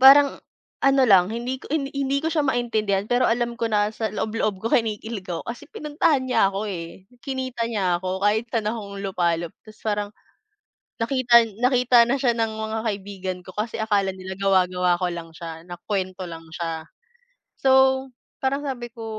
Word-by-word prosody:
parang 275 +2 +7 0.4
ano 275 0 +5
lang, 185 -3 +6
hindi 245 +3 -3
ko - - -12
hi 290 -3 0
hindi 275 0 0
ko - - +2
siya 315 - +2
maintindihan, 215 -6 0
pero 245 +1 +3
alam 240 +1 +1
ko 230 -1 -1
na, 210 0 +2
sa 220 0 -1
loob-loob 215 -2 -1
ko 225 - -1
kinikilig 220 -3 -1
ako, 170 -2 -3
kasi 240 +5 -6
pinuntahan 295 -2 +1
niya 250 -6 +3
ako, 195 +2 -2
eh. 170 +1 -8 0.2
Kinita 255 -3 -3
niya 185 -6 +1
ako, 185 +1 -3
kahit 220 +3 +2
saan 225 -2 0
akong 205 -3 -6
lupalop, 170 -3 0
tas 215 -1 -14
parang, 205 -1 0 0.9
nakita 235 -1 +5 0.2
nakita 250 -1 +5
na 270 - +2
siya 245 -2 +3
ng 225 -1 0
mga 220 0 -3
kaibigan 195 -3 -4
ko, 185 - -10
kasi 215 +2 -2
akala 205 -3 +1
nila 190 0 -7
gawa-gawa 185 -2 +3
ko - - +3
lang 170 -1 -7
siya, 165 -1 -8
na 175 - -7 0.2
kuwento 185 -2 -2
lang 165 0 -9
siya. 165 -2 -4 0.7
So, 265 0 +4 0.3
parang 275 +2 0
sabi 255 -4 -4
ko 230 -2 -8
220 Hz, 175 wpm, -24 LUFS, 190-250 Hz, 0.9 s, parang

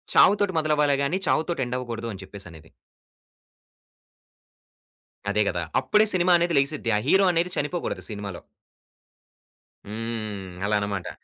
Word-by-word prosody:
చావుతోటి 200 -2 +5
మొదలవ్వాలే 150 -2 +2
గాని, 160 +7 0
చావుతోటి 160 -3 +1
ఎండ్ 125 +1 -2
అవ్వకూడదు" 115 -2 -5
అని 95 0 -9
చెప్పసనేది. 90 -5 -11 2.6
అదే 105 +1 +2
గదా! 85 - -2 0.2
అప్పుడే 210 +1 +3
సినిమా 180 0 +3
అనేది 170 -2 +1
లెగిసిద్ది. 140 -3 0
ఆ - - +2
హీరో 195 +4 +5
అనేది 170 +1 +1
చనిపోగూడదు 165 +4 -2
సినిమాలో. 100 -3 -6 1.5
హ్మ్. 110 -3 -5
అలానమాట. 100 -2 -1
120 Hz, 110 wpm, -25 LUFS, 100-165 Hz, 2.6 s, చావుతోటి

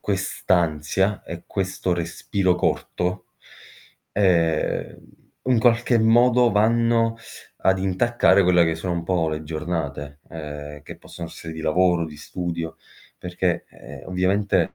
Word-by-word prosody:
quest'ansia 95 -1 0
e 85 0 -8
questo 95 -2 -2
respiro 90 +2 -1
corto, 90 +1 -2 0.9
ehm, 85 -5 +1 0.5
in 125 -3 +3
qualche 120 +1 +3
modo 120 +2 +4
vanno 115 +1 +2 0.4
ad 95 0 +2
intaccare 95 +1 +3
quelle 90 -1 +4
che 80 0 0
sono 85 +2 -3
un 85 - -2
po' 85 -2 +1
le 75 0 -4
giornate, 75 -3 -4
ehm, 75 -2 -8
che - - -10
possono 85 -1 -9
essere 80 - -9
di 80 - -7
lavoro, 85 +2 +2
di 75 -2 -11
studio, 85 +1 -5 0.4
perché, 90 -1 -2
ehm, - - -12
ovviamente 95 +3 +1
90 Hz, 120 wpm, -23 LUFS, 80-100 Hz, 0.9 s, modo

